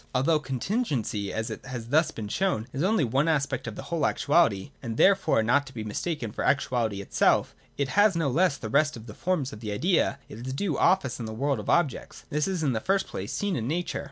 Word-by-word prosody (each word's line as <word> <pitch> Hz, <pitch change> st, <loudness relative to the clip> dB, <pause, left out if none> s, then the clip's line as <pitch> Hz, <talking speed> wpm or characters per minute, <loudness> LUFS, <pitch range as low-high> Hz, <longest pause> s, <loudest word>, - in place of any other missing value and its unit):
265 -, -, +4 dB
Although 155 Hz, -, +3 dB
contingency, 130 Hz, -, -2 dB
as 110 Hz, 0 st, -3 dB
it -, -, -7 dB
has 120 Hz, -3 st, -7 dB
thus 155 Hz, +4 st, +3 dB
been 110 Hz, -2 st, -6 dB
shown, 115 Hz, -, 0 dB
is 135 Hz, -, -2 dB
only 190 Hz, -1 st, +2 dB
one 135 Hz, +5 st, +1 dB
aspect 140 Hz, -5 st, 0 dB
in 110 Hz, -, -5 dB
the -, -, -7 dB
whole 170 Hz, -3 st, -2 dB
of -, -, +4 dB
actuality, 145 Hz, -, +2 dB
and 115 Hz, -3 st, -5 dB
therefore 195 Hz, -, +4 dB
not 140 Hz, +5 st, +2 dB
to 135 Hz, -, -11 dB
be 110 Hz, -, -4 dB
mistaken 115 Hz, +3 st, -3 dB
for -, -, -4 dB
actuaUty 120 Hz, -7 st, +1 dB
itself, 100 Hz, -, +2 dB, 0.2 s
it 140 Hz, -2 st, -1 dB
has 205 Hz, +4 st, +4 dB
no 165 Hz, -3 st, +1 dB
less 155 Hz, +2 st, +2 dB
than 110 Hz, -4 st, -6 dB
the -, -, -3 dB
rest 150 Hz, -2 st, +3 dB
of 110 Hz, -, -11 dB
the 105 Hz, -, -9 dB
forms 155 Hz, -3 st, -1 dB
of 110 Hz, -, -9 dB
the 105 Hz, -2 st, -5 dB
idea 165 Hz, -, +1 dB
its 125 Hz, +4 st, -6 dB
due 160 Hz, +2 st, -1 dB
office 170 Hz, -9 st, +2 dB
in 115 Hz, -, -4 dB
the -, -, -5 dB
world 140 Hz, +1 st, 0 dB
of 105 Hz, -, -6 dB
objects. 170 Hz, -7 st, 0 dB
This 150 Hz, +3 st, 0 dB
is, 185 Hz, -4 st, -2 dB
in 135 Hz, -4 st, +1 dB
the 110 Hz, -, 0 dB
first 195 Hz, -, +1 dB
place, -, -, -6 dB
seen 205 Hz, -3 st, -1 dB
in 115 Hz, -4 st, -2 dB
Nature. 170 Hz, +5 st, -2 dB
140 Hz, 240 wpm, -27 LUFS, 115-170 Hz, 0.2 s, 265